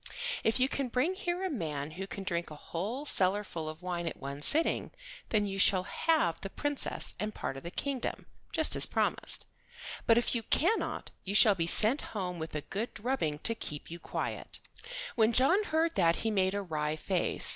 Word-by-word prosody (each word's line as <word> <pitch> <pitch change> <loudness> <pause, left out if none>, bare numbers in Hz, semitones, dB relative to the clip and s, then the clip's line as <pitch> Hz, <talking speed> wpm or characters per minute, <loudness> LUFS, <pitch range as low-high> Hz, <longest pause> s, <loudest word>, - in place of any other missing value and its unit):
If 225 +3 +1
you 255 - +3
can 275 -1 -3
bring 255 +9 0
here 360 -1 -3
a - - -1
man 155 - -4
who 190 +4 -7
can 195 - -7
drink 170 -2 -3
a 155 - -9
whole 210 - -5
cellar 200 -5 +3
full 160 -5 -6
of 155 +3 -10
wine 175 -2 -3
at - - -4
one 140 +1 -7
sitting 320 - +3 0.4
then 210 -2 +1
you 195 -1 -4
shall 185 -1 +4
have 250 - 0
the 195 - -5
Princess 290 +6 0
and 215 0 -4
part - - -4
of 135 - -8
the 170 - -7
kingdom, 270 +6 -4 0.3
just 315 -2 +5
as - - +10
promised; - - +1 0.6
but 230 - +5
if 235 - +1
you 235 - -1
cannot 350 - 0
you 200 +1 -4
shall 215 0 +7
be 165 -3 -2
sent 225 - +7 0.2
home 180 -3 -4
with 160 -1 -6
a 150 - -2
good 210 +10 -5
drubbing 210 - -2
to 230 - +1
keep 150 -9 -7
you 170 - -7
quiet." - - -5 0.6
When 225 0 +2
John 345 - +3
heard 325 0 0
that 170 -3 +2
he 220 - +1
made 190 -1 +1
a 200 - -2
wry 155 -3 -2
face. 180 +3 0
200 Hz, 200 wpm, -30 LUFS, 170-255 Hz, 0.6 s, as